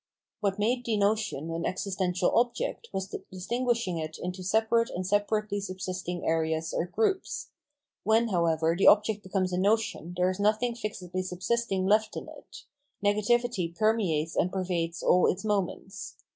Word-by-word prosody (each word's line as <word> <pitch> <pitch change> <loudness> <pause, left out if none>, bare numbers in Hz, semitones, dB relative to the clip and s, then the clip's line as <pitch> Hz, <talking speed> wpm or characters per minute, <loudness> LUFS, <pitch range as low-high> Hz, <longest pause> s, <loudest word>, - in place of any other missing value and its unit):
What 200 -2 0
made 240 +4 +1
the 225 -3 0
notion 200 -7 0
an 165 0 -3
existential 185 -1 0
object 245 - 0
was 190 0 -3
the - - -6
distinguishing 230 -1 -1
it 155 0 -5
into 180 +1 -5
separate 220 +4 +2
and 185 +1 -4
separately 205 +1 0
subsist 185 -2 -5
ing 175 0 -3
areas 160 0 0
or 170 - 0
groups; 395 - -1 0.5
when, 225 +2 +3
however, 165 -3 +2
the 195 - +3
object 210 0 +5
becomes 185 -2 -1
a 180 - +1
notion 200 -4 0
there 180 +1 +3
is 185 - -6
nothing 215 +4 +2
fixedly 185 -5 -4
subsisting 185 +2 -1
left 215 +3 +2
in - - -6
it; - - -12 0.4
negativity 210 -3 +1
permeates 180 -8 +1
and 180 - +1
pervades 175 -3 -2
all 180 - +5
its 195 +4 -6
moments. 195 -2 -2
195 Hz, 155 wpm, -28 LUFS, 180-220 Hz, 0.5 s, object